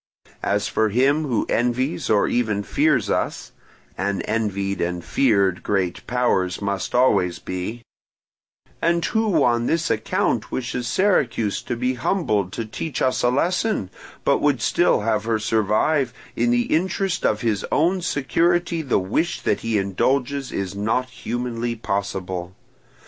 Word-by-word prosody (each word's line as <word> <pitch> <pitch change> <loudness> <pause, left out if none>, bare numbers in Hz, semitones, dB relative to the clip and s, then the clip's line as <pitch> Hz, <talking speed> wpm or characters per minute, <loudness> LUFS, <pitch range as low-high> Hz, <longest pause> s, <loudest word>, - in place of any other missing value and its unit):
As 100 0 0
for 110 0 +1
him 135 +8 +2
who 125 -6 0
envies 125 +5 0
or 105 -2 +3
even 110 -4 0
fears 140 -4 +2
us - - -2 0.4
(and 100 +1 -1
envied 100 -3 -1
and 85 0 -2
feared 100 -8 +2
great 95 -3 -1
powers 95 -8 +1
must 100 +1 -3
always 90 -8 +3
be), 95 +6 -5 1.0
and 170 0 +2
who 215 -9 +2
on 120 -1 +2
this 165 -3 +1
account 110 -1 0
wishes 125 -1 -3
Syracuse 120 - +1
to 120 - -4
be 125 +2 0
humbled 115 - 0
to 115 - -3
teach 130 +5 -5
us 130 - +1
a 120 - +3
lesson, 170 - 0 0.3
but - - +3
would - - +2
still - - +2
have 110 0 0
her 115 -1 +1
survive, 115 +5 +1 0.2
in 120 +1 +1
the 120 0 +1
interest 185 +2 -1
of 105 0 +1
his 110 -4 0
own 180 +5 +2
security 170 +2 +1
the 140 -5 +1
wish 110 - -1
that - - 0
he 115 -2 -1
indulges 130 +8 0
is 95 -1 -3
not 110 +5 -1
humanly 120 -1 -3
possible. 95 -4 -3
120 Hz, 145 wpm, -22 LUFS, 100-140 Hz, 1.0 s, or